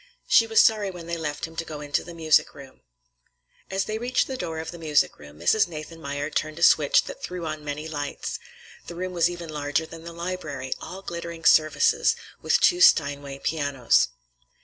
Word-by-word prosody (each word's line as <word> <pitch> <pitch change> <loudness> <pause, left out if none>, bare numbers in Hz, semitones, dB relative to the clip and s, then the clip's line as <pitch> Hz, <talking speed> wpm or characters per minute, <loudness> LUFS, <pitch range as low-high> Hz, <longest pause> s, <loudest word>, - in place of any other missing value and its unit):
She 225 - +5
was 225 0 +3
sorry 215 -3 +3
when 175 -3 -9
they 170 0 -3
left 155 -3 -3
him 165 0 -12
to 165 - -1
go 155 -2 -8
into 145 0 -1
the 175 -1 -10
music 160 -2 +2
room. 135 -2 -13 0.9
As 190 0 -1
they 215 +1 -3
reached 250 +2 +1
the 265 - -5
door 165 -10 -4
of 160 0 -5
the 175 - -10
music 150 -3 +1
room, 75 0 -13
Mrs. 180 - +3
Nathanmeyer 155 -2 -6
turned 155 +1 -2
a 170 - -2
switch - - +5
that - - -9
threw 180 -2 -5
on 155 -1 -5
many 150 +1 -5
lights. 145 -2 -4 0.5
The 170 - -7
room 185 +1 -4
was 170 -1 +3
even 175 -2 -7
larger 150 +1 -1
than 165 0 -11
the 170 - -8
library, 165 -7 -4
all 190 +2 -8
glittering 170 -2 -7
surfaces, 160 - +4 0.3
with - - +3
two 355 0 +4
Steinway 140 - +3
pianos. 145 -6 +2
165 Hz, 195 wpm, -25 LUFS, 145-180 Hz, 0.9 s, She